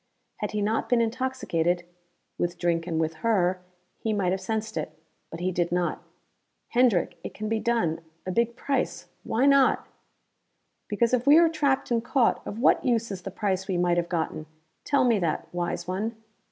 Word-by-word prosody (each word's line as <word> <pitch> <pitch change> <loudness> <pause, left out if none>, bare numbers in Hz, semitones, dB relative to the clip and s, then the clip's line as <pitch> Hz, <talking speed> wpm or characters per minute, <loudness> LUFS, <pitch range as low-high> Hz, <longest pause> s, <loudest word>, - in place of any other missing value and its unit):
Had 210 - -3
he 210 -1 -2
not 220 +2 0
been 245 - +4
intoxicated 225 -8 0 0.6
with 175 0 -1
drink 170 -1 0
and 165 -2 -1
with 160 0 -1
her 185 -5 +2 0.4
he 220 - -1
might 190 -4 +1
have 190 0 -1
sensed 220 -1 -3
it. - - -4 0.3
But 165 - -8
he 185 +1 0
did 175 -1 -1
not. 175 0 0 0.7
"Hendrick, 240 -8 +2
it - - -7
can 215 - -4
be 220 0 0
done. 225 -9 0 0.2
A 185 - -2
big 235 +3 +1
price. 270 +1 -2
Why 245 +4 +1
not?" 275 -1 +4 1.0
"Because 230 +3 +1
if 250 +1 +1
we 295 +2 +8
are 335 0 +6
trapped 280 -6 0
and 230 -1 +2
caught, 245 -1 +2
of 205 - -5
what 235 - +4
use 230 -4 +1
is 190 -2 -5
the 195 - -5
price 190 -1 -2
we 185 -3 0
might 175 0 +2
have 170 0 0
gotten? 160 -2 -2 0.4
Tell 280 -2 +3
me 230 -4 +3
that, 170 -4 -1
wise 175 0 -2
one?" 210 +5 -2
210 Hz, 185 wpm, -26 LUFS, 175-235 Hz, 1.0 s, we